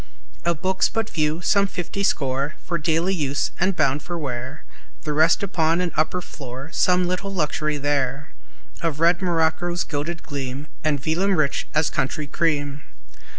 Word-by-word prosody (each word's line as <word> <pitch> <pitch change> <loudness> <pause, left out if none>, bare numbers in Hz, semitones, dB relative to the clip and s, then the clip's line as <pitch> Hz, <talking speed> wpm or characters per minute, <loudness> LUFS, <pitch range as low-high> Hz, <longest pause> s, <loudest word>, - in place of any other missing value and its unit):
Of 170 -1 0
books 185 0 +2
but 225 -1 -2
few, 155 +1 0
some 200 +2 +3
fifty 190 +1 -4
score 140 -5 +1
For 170 -1 -1
daily 165 +4 +2
use, 145 -5 0
and 185 +1 +2
bound 145 -3 +2
for 175 +2 -4
wear; 130 -1 -5 0.4
The 150 - -1
rest 160 +5 +4
upon 165 -3 +2
an 180 -2 0
upper 155 +4 +1
floor; 135 -2 -8
Some 180 0 +3
little 185 +2 -2
luxury 155 -4 0
there 145 0 -1 0.5
Of 160 -3 -1
red 170 +2 +4
morocco's 175 0 +1
gilded 160 +3 -3
gleam 140 -1 -4 0.2
And 150 -2 +1
vellum 175 +7 +1
rich 150 -4 +1
as 155 0 +3
country 150 +2 -1
cream. 145 -2 0
160 Hz, 155 wpm, -23 LUFS, 145-175 Hz, 0.5 s, rest